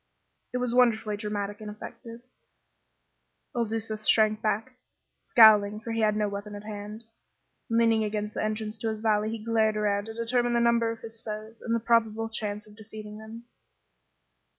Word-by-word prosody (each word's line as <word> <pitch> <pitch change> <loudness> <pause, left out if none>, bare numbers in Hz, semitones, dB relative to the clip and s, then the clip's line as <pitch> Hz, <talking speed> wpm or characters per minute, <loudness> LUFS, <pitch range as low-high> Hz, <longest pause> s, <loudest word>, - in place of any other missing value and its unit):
It 250 - -1
was 250 -1 -1
wonderfully 230 -4 +3
dramatic 205 0 -4
and 210 - -6
effective. 230 +2 -9 1.3
Il 235 -1 +1
Duca 220 0 -3
shrank 215 0 +3
back, 225 +4 -2 0.4
scowling, 210 -3 +6
for 230 +1 -6
he 225 - -1
had 215 -1 +3
no 210 -1 +1
weapon 205 +1 -6
at 205 - -8
hand. 210 +1 -7 0.7
Leaning 230 -1 +3
against 210 0 -3
the - - -2
entrance 215 0 -3
to 225 - -1
his 220 -1 -4
valley 215 -1 +2
he 225 -1 -6
glared 220 -2 +2
around 205 -1 0
to 225 0 -8
determine 240 +1 +1
the 235 - +3
number 235 -1 +3
of 225 0 -5
his 225 0 -9
foes 215 +1 -7
and 230 -1 -1
the - - +1
probable 225 -1 +1
chance 210 -1 -4
of 210 -1 -16
defeating 215 -1 -10
them. 220 +2 -10
220 Hz, 175 wpm, -27 LUFS, 210-230 Hz, 1.3 s, scowling